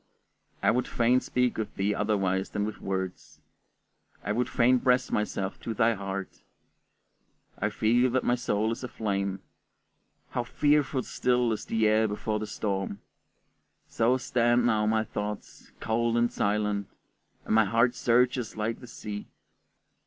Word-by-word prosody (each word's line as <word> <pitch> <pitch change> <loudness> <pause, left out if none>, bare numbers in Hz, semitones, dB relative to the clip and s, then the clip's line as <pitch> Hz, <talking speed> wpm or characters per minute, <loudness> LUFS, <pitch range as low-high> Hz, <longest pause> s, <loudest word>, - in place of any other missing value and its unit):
I - - +5
would 125 +1 0
fain 120 +2 +3
speak 125 -2 0
with 110 - -4
thee 100 +2 0
otherwise 95 -3 0
than 105 0 -2
with 110 - -6
words; 95 -1 -4 0.8
I 105 - -2
would 120 +3 0
fain 125 +1 +3
press 125 +1 +2
myself 100 -2 -2
to 115 - -5
thy 115 -1 +3
heart. 95 -1 -5 1.2
I 105 - +1
feel 120 +4 +2
that 130 +1 0
my 120 - +2
soul 110 -3 0
is 115 - -5
aflame. 100 -5 -2 0.9
How 120 - -1
fearfully 145 0 +1
still 125 -1 +1
is 110 - -3
the 110 -1 +1
air 110 +1 +3
before 105 +1 -2
the 110 - -4
storm! 100 -1 -3 0.9
So 120 +3 +2
stand 120 -1 +2
now 110 -3 +2
my 110 0 +2
thoughts, 105 -1 -6
cold 115 +1 0
and 120 0 +2
silent, 105 -1 0 0.6
and - - -1
my 110 0 +5
heart 115 +4 +3
surges 125 -1 +1
like 110 +2 -2
the 125 - -11
sea. 105 -3 -7
110 Hz, 145 wpm, -28 LUFS, 105-120 Hz, 1.2 s, I